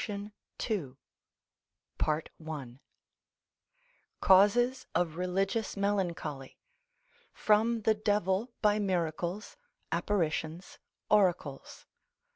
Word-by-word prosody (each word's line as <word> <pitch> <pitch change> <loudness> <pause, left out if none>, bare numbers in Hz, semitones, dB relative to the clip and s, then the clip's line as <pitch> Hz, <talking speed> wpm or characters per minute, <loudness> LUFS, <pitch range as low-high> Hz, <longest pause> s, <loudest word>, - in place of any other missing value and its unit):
SUBSECT. - - -4 1.7
II.—_Causes 200 - -1
of 165 -2 +1
Religious 195 +5 -1
melancholy. 175 -9 -2 0.7
From 220 +2 +2
the 220 +1 +3
Devil 210 +1 0
by 210 0 +4
miracles, 180 0 -2 0.3
apparitions, 165 -3 -2 0.3
oracles. 180 -9 +1
195 Hz, 60 wpm, -31 LUFS, 165-210 Hz, 1.7 s, by